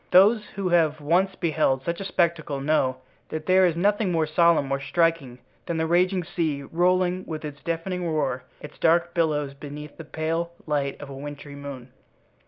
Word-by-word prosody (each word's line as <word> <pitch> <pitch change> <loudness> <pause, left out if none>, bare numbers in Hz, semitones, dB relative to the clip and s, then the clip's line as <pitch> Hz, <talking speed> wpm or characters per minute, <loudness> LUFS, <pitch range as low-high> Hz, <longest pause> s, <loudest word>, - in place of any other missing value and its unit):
Those 205 +4 +6
who 195 -2 -1
have 160 -3 +3
once 175 +6 +2
beheld 155 -6 +1
such 170 +4 -3
a - - -4
spectacle 165 -6 0
know 135 -3 +1 0.3
that 155 0 -5
there 185 0 +5
is 170 - 0
nothing 205 +2 +2
more 165 -2 +2
solemn, 165 -1 +3
more 135 0 -1
striking, 155 -3 0 0.3
than 170 - -1
the 160 - +1
raging 180 +2 +2
sea, 160 -5 -2
rolling, 180 +3 +1
with 155 -1 -5
its 140 -2 -8
deafening 170 +2 -2
roar, 140 -5 -1 0.2
its 150 - -11
dark 170 +1 +3
billows 150 -4 0
beneath 145 +1 -9
the 165 - -7
pale 165 +2 -2
light 145 -3 -1
of 145 -1 -8
a - - -7
wintry 145 +1 -8
moon. 140 -3 -8
160 Hz, 180 wpm, -25 LUFS, 145-175 Hz, 0.3 s, Those